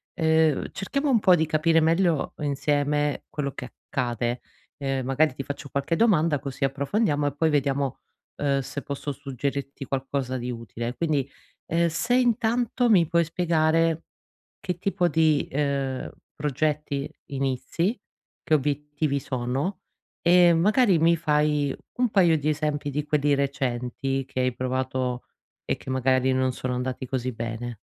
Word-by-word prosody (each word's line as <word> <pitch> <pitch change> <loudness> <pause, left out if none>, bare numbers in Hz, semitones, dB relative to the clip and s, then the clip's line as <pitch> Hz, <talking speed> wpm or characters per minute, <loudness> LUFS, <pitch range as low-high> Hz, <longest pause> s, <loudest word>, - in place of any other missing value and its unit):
ehm, 160 -3 +2
cerchiamo 275 +9 -1
un 245 -4 +4
po' 180 -1 +6
di 160 - +1
capire 160 +1 +3
meglio 165 -1 +2
insieme 145 0 0
quello 140 -3 -3
che - - -7 0.2
accade. 120 -1 -1 0.4
Uhm, 135 -2 -1
magari 135 +2 +2
ti 135 - -4
faccio 140 0 -6
qualche 140 +5 -1
domanda 165 -9 +3
così 140 0 -2
approfondiamo, 145 +3 0
e 145 - -2
poi 160 +2 +2
vediamo, 140 -2 0 0.4
uhm, 140 -1 +1
se 140 +1 -5
posso 140 +1 -4
suggerirti 140 +1 -4
qualcosa 135 -1 -2
di 125 0 -4
utile. 115 +1 -5
Quindi, 145 -3 -1 0.4
ehm, 170 +1 +2
se 230 +10 0
intanto 245 0 +2
mi 180 -7 +5
puoi 170 +1 +3
spiegare 165 -1 +1 0.6
che 180 -2 -3
tipo 185 -1 +1
di, 155 -2 +2
ehm, 140 -2 -1 0.3
progetti 150 0 -1 0.2
inizi, 140 - -1 0.4
che 155 - +2
obiettivi 145 0 0
sono 130 +8 -2 0.4
e 175 0 +6
magari 200 +2 +4
mi 165 +2 +4
fai 150 -3 +1 0.2
un 250 0 +2
paio 175 -6 +4
di 150 +1 -2
esempi 150 -1 -1
di 145 +1 -2
quelli 145 -1 +2
recenti 135 -1 -1
che 130 - -4
hai 125 -1 +1
provato 130 0 -2 0.4
e - - 0
che - - -9
magari 130 0 +2
non 130 0 +1
sono 125 0 -4
andati 125 +1 -3
così 130 0 -2
bene. 115 +1 -5
145 Hz, 145 wpm, -25 LUFS, 130-165 Hz, 0.6 s, po